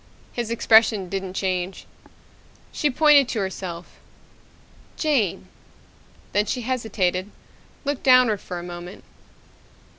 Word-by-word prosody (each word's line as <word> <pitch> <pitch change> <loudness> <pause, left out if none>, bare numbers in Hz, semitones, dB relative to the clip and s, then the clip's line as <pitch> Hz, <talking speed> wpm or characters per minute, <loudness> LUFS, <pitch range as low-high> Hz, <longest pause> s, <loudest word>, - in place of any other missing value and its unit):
His 235 -2 -3
expression 220 -4 +3
didn't 190 -1 -4
change. 185 -1 -2 0.9
She 300 - 0
pointed 290 -1 +5
to 225 - -2
herself. 185 -3 -6 1.0
"Jane." 230 - 0 0.9
Then 205 +2 +1
she 250 - -2
hesitated, 210 -6 -1 0.6
looked 285 -1 -2
downward 255 -6 +4
for 180 - -6
a 175 - -6
moment. 175 +1 -9
205 Hz, 100 wpm, -23 LUFS, 185-250 Hz, 1.0 s, pointed